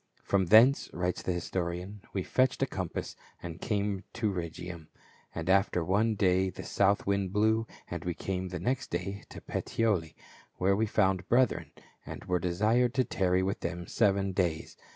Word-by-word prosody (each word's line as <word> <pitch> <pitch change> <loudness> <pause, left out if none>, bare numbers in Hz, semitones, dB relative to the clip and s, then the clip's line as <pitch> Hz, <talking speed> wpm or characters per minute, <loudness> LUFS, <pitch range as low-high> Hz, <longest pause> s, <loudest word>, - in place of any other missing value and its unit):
" - - -34
From 95 -2 +3
thence," 115 +8 +6
writes 90 0 -1
the - - -1
historian, 90 +2 -3
" - - -30
we 95 - -2
fetched 130 +5 +1
a - - +4
compass, 95 -9 -4 0.3
and 85 0 -7
came 100 -2 -1
to 110 -3 -1
Rhegium: 85 -1 -6 0.5
and 80 0 -4
after 95 -2 +3
one 105 +5 +2
day 95 -1 +2
the 90 - -8
south 100 0 +2
wind 100 -1 0
blew, 110 +2 +2 0.2
and 85 -2 -5
we 90 -1 -2
came 95 -1 -3
the 90 0 -5
next 130 +9 -1
day 100 0 -3
to - - -10
Puteoli, 100 -9 -1 0.4
where 95 +2 +2
we 110 +2 +1
found 95 -3 +1
brethren, 125 -2 +2 0.3
and - - -8
were 90 0 +1
desired 110 +8 +1
to 130 - +3
tarry 95 -4 +1
with 95 +2 -1
them 85 0 -4
seven 100 -2 +1
days. 90 -4 -1
95 Hz, 175 wpm, -30 LUFS, 90-105 Hz, 0.5 s, thence